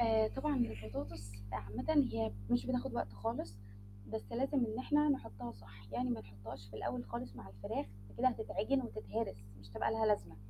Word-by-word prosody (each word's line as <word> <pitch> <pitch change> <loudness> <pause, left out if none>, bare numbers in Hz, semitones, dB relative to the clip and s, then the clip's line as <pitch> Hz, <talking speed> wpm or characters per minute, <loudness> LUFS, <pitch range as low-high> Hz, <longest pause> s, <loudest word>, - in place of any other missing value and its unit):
آآ 220 -2 +6
طبعًا 285 +4 +1
البطاطس 105 - -2 0.2
عامةً 110 - +3
هي 110 -1 +1 0.2
مش 120 - +4
بتاخد 255 +1 +1
وقت 100 - 0
خالص، 100 0 -2 0.6
بس 110 -2 -3
لازم 270 +3 +2
إن 220 +1 -2
إحنا 295 +3 +4
نحطها 120 - -1
صح، 100 0 -14
يعني 125 +2 +1
ما 115 -2 +1
نحطهاش 100 0 -9
في 110 - -8
الأول 245 - -1
خالص 235 - -4
مع 105 -5 -8
الفراخ 100 0 -2 0.2
فكده 100 - +4
هتتعجن 245 +2 +1
وتتهرس 225 - -2 0.2
مش 100 0 -13
هتبقى 100 - +1
لها 220 0 +3
لازمة، 205 - +2
120 Hz, 170 wpm, -37 LUFS, -, 0.6 s, آآ